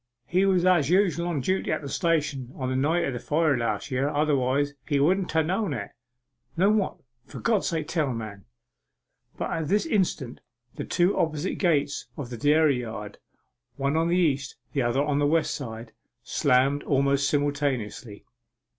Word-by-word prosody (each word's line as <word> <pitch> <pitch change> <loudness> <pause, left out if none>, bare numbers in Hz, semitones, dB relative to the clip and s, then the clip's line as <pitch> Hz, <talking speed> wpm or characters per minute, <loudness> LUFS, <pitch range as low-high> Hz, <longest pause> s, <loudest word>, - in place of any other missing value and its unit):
He 185 +8 +2
was 185 -2 +3
as 175 -6 +4
usual 180 -2 +2
on 160 -6 -1
duty 185 +8 -1
at - - -2
the - - -5
station 150 -5 -1
on 130 -2 -3
the - - -1
night 160 +6 +1
of 135 - -2
the 120 - -4
fire 150 +2 +1
last 120 +3 -2
year, 135 +2 0
otherwise 145 -1 +1
he 145 -3 +1
wouldn't 180 +6 +2
ha' 160 0 +3
known 185 -2 -1
it.' 100 -4 -6 0.7
'Known 200 +5 +4
what? 195 - -2 0.3
For - - -9
God's 220 -4 +1
sake 160 -4 -2
tell, 155 -5 0
man!' 110 -5 -7 0.9
But - - -3
at 160 -2 -2
this 205 - +2
instant 180 - -1 0.3
the - - -6
two 180 +3 +2
opposite 160 +2 -1
gates 145 -6 +1
of 125 -4 -6
the 120 - -5
dairy 145 +1 +3
yard, 105 -3 -7 0.6
one 140 +2 -1
on 165 +1 +2
the 175 +1 +2
east, 140 -7 0 0.2
the 140 - +1
other 120 +3 +1
on 145 -1 0
the 145 - +2
west 160 +1 +1
side, 115 -4 -7 0.3
slammed 135 +2 +2
almost 140 0 +1
simultaneously. 140 -7 -2
145 Hz, 175 wpm, -26 LUFS, 130-170 Hz, 0.9 s, as